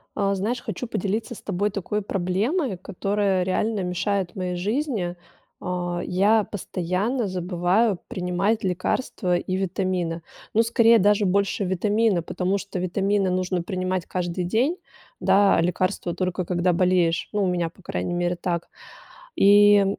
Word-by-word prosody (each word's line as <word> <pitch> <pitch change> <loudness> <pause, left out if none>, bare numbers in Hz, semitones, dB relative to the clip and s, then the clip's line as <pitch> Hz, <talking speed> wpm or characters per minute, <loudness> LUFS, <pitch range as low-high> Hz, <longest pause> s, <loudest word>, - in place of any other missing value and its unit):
А, 200 -1 +1
знаешь, 225 +6 -2
хочу 220 +4 -5
поделиться 220 +3 -2
с - - -12
тобой 200 +1 -1
такой 210 +1 -3
проблемой, 200 - -1
которая 195 0 0
реально 200 +3 0
мешает 185 +1 -1
моей 180 -1 -3
жизни. 210 - -1 0.4
А, 175 -1 -3
я 205 +4 +3
постоянно 200 +5 -2
забываю 185 +3 +1
принимать 185 +4 -1
лекарства 185 0 -1
и 185 +1 -3
витамины. 185 -3 -1 0.3
Ну, 225 - +4
скорее, 230 0 +5
даже 205 +2 +3
больше 200 +1 +1
витамины, 205 +1 +1
потому 185 +4 -1
что 195 -1 -5
витамины 195 +2 +1
нужно 185 0 0
принимать 185 0 -2
каждый 180 0 -3
день, 245 - +1 0.4
да, 200 0 +4
а - - +3
лекарства- 175 0 -1
только 185 0 -2
когда 175 +1 +1
болеешь. 175 -2 +2
Ну, 205 -1 +1
у - - +2
меня, 175 -2 0
по 180 - -21
крайней 175 - -3
мере, 175 0 0
так. 175 -1 -3 0.7
И, 205 0 +6
185 Hz, 140 wpm, -24 LUFS, 180-205 Hz, 0.7 s, И